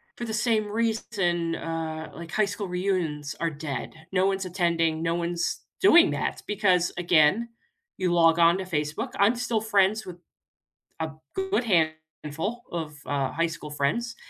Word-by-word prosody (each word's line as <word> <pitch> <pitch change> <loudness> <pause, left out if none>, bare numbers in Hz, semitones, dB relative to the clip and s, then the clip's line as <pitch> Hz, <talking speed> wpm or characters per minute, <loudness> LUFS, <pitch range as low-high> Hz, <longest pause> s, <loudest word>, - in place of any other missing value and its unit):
for 240 - -5
the 220 - -4
same 220 -1 +1
reason, 205 -6 0
uh, 160 -1 -4
like, 165 -1 -9
high 215 - +2
school 200 0 -4
reunions 180 -6 -2
are 165 - +1
dead. 145 -2 -5 0.2
No 185 0 +2
one's 195 0 0
attending, 170 -3 0
no 165 0 +1
one's 170 0 -2 0.2
doing 350 -2 +7
that - - -2
because, 185 -4 +2
again, 175 +6 +3 0.5
you 185 -2 0
log 165 -1 +5
on 170 +1 +6
to 190 - -3
Facebook 160 - -2
I'm 205 +5 +5
still 240 -2 -1
friends 215 0 +2
with 180 -2 -8 0.8
a - - -2 0.2
good 385 -6 0 0.6
handful 190 +11 -4
of, 160 -3 -5
uh, 140 -2 -1
high 165 +1 +1
school 160 -2 -7
friends, 150 +12 -1
180 Hz, 155 wpm, -26 LUFS, 165-215 Hz, 0.8 s, doing